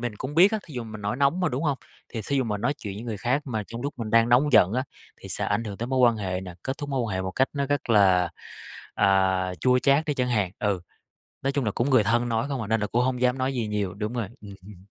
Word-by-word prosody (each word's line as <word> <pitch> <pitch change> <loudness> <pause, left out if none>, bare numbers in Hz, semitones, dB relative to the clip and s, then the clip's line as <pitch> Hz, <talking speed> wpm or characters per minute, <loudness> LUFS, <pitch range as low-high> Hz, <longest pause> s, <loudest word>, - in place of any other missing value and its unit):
mình 120 -3 -3
cũng 130 +3 -5
biết 185 +6 +6
á, 220 - +1
thí 155 - -11
dụ 120 -2 -4
mình 110 -1 -8
nổi 105 +4 -2
nóng 140 +6 +2
mà, 180 - +2
đúng 130 0 -3
hông? 145 -4 0 0.3
Thì 115 - -5
thí 140 - 0
dụ 135 - +2
mà 105 -3 -2
nói 120 +8 0
chuyện 100 -3 -6
với 105 - -7
người 115 -3 -4
khác 125 +8 0
mà 110 -5 -2
trong 115 +1 -7
lúc 145 +1 -3
mình 110 -2 -4
đang 115 +1 +4
nóng 130 +4 +4
giận 95 -4 +6
á, 130 +2 0 0.4
thì - - -10
sẽ - - 0
ảnh 105 +3 0
hưởng 100 -3 -6
tới 120 - -4
mối 130 +1 -1
quan 120 -2 +5
hệ 95 -3 -3
nè, 90 -2 -8
kết 130 +2 -4
thúc 145 -2 -5
mối 135 -2 -1
quan 110 -5 -3
hệ 95 - -1
một 95 - -3
cách 130 +8 +1
nó 140 -1 -1
rất 145 -3 -1
là, 95 -5 +4 0.6
à, 95 -1 +2
chua 125 +6 +4
chát 140 +4 +3
đi 150 -2 -1
chẳng 125 -2 0
hạn, 105 -7 +1
ừ. 100 -3 0 0.6
Nói 135 - 0
chung 140 -3 -1
là 105 - +1
cũng 120 +7 -1
người 130 -5 +5
thân 120 +3 +1
nói 115 +2 0
không 140 -4 -3
à, 105 - -5
nên 110 0 +1
là 105 - 0
cũng 120 +4 +1
hông 125 -1 -1
dám 125 +1 +2
nói 130 +1 -1
gì 120 -4 -2
nhiều, 105 -3 -2
đúng 105 +3 -4
rồi. 115 -4 -2
Ừm. 100 -2 -13
120 Hz, 300 wpm, -25 LUFS, 105-130 Hz, 0.6 s, biết